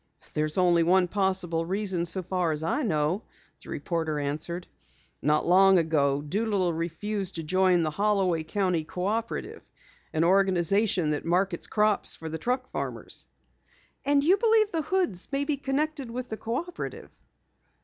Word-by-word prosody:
"There's 155 +2 -1
only 175 -2 +4
one 180 +2 +4
possible 185 -4 0
reason 185 -1 -1
so 185 +2 0
far 180 -2 0
as 155 0 -2
I 170 - 0
know," 160 - 0 0.4
the - - -13
reporter 160 -4 -2
answered. 155 +5 -3 0.6
"Not 150 +1 +2
long 190 +2 +6
ago 145 -4 +1
Doolittle 195 +1 0
refused 190 +4 -3
to 165 - -4
join 180 +1 +3
the 155 - -1
Holloway 195 -2 +1
County 180 0 0
Cooperative, 210 +8 -3 0.5
an 160 - +1
organization 190 -1 +2
that 150 - -2
markets 180 +1 0
crops 210 -1 +1
for 160 - -7
the 160 +1 -5
truck 255 +6 -2
farmers." - - -5 0.8
"And 280 0 +3
you 365 +6 +5
believe 440 -1 +3
the 325 - 0
Hoods 345 - -1
may 280 0 0
be 295 -2 0
connected 280 0 -2
with 245 +1 -5
the 220 - -4
Cooperative?" 275 +13 -5
185 Hz, 150 wpm, -27 LUFS, 165-220 Hz, 0.8 s, long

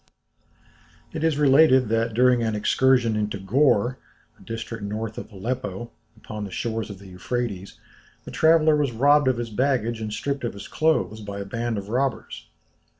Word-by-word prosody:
It - - -4
is 160 -3 +1
related 135 -3 +5
that, 115 0 0
during 125 0 +4
an 110 -2 -1
excursion 120 +2 +2
into 105 -1 -2
Gor, 120 +3 +2 0.4
a - - -19
district 115 -1 -6
north 110 +2 -4
of - - -10
Aleppo, 115 +1 -5 0.3
upon 105 -1 -7
the 100 - -5
shores 115 +2 -3
of 100 - -8
the 100 - -15
Euphrates, 100 +1 -4 0.5
the - - -8
traveller 160 -1 +4
was 145 -3 0
robbed 145 +4 +4
of 130 -2 +2
his 120 -1 -4
baggage 120 -2 0
and 110 -1 -4
stripped 140 +6 -3
of 120 - -2
his 100 - -9
clothes 155 -9 0
by 100 -1 -6
a 100 - -5
band 115 +2 -3
of 100 0 -6
robbers. 130 +2 -2
115 Hz, 170 wpm, -24 LUFS, 105-130 Hz, 0.5 s, related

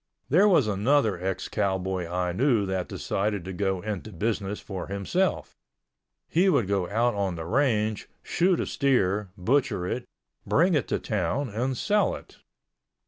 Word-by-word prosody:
There 185 +9 +5
was 170 - +5
another 105 -1 +2
ex 95 -1 -2
cowboy 95 -3 -1
I 90 0 -1
knew 115 +1 +2
that 95 -2 -2
decided 100 -2 -2
to 95 - -5
go 95 -1 -1
into 105 +1 -5
business 105 +1 -2
for 95 -3 -6
himself. 100 - -1 0.7
He 185 +4 +3
would 120 - +2
go 95 -3 0
out 115 +3 +2
on 100 -3 -1
the 80 -1 -6
range, 110 - 0
shoot 180 +1 +2
a - - 0
steer, 105 -8 +1
butcher 115 -1 +1
it, 120 +7 -3 0.4
bring 175 +5 +3
it 145 -6 +1
to - - 0
town 105 +7 -1
and 125 +5 -2
sell 210 - +2
it. - - -13
105 Hz, 155 wpm, -26 LUFS, 95-135 Hz, 0.7 s, There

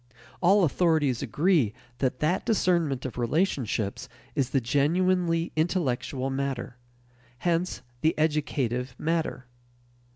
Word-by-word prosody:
All 190 +3 +5
authorities 155 -6 +2
agree 155 - +2 0.2
that 130 -2 -1
that 175 +6 +1
discernment 170 - +1
of 125 -1 -5
relationships 120 - -1 0.2
is 130 -3 0
the 135 - +2
genuinely 165 +6 +1
intellectual 140 -5 -1
matter; 135 -3 -3 0.6
hence, 170 -3 -1 0.2
the 160 - +2
educative 135 -5 0
matter. 160 -5 -1
150 Hz, 100 wpm, -27 LUFS, 130-170 Hz, 0.6 s, All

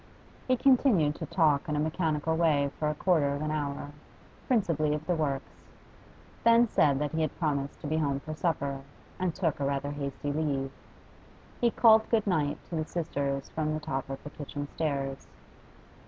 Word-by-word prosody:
He 255 -1 +3
continued 240 - +4
to - - -5
talk 155 -3 +2
in 150 - 0
a - - 0
mechanical 160 0 0
way 150 -4 +2
for 150 - +1
a 150 - -2
quarter 150 -4 +2
of 145 - -4
an 155 - -1
hour, 145 -1 -3 0.6
principally 165 - +2
of 150 +1 -6
the 180 - +1
works; 140 -4 -3 0.8
then 230 +1 +6
said 145 -9 +3
that 150 +1 -1
he 160 - -1
had 155 - -2
promised 140 -4 -1
to - - -8
be 155 +2 0
home 140 -3 0
for 155 +2 -6
supper, 140 -4 -1 0.4
and 180 -3 -1
took 165 -7 -1
a - - -1
rather 140 0 -1
hasty 145 0 -4
leave. 140 -3 -1 0.9
He 240 - +4
called 220 -1 +5
good 225 -3 +2
night 155 -7 +1
to - - -2
the 155 -1 -1
sisters 140 -5 -2
from 155 -1 -1
the - - -2
top 135 -4 -4
of 135 0 -6
the 145 - -8
kitchen 145 -1 -6
stairs. 140 -4 -2
150 Hz, 185 wpm, -29 LUFS, 140-165 Hz, 0.9 s, then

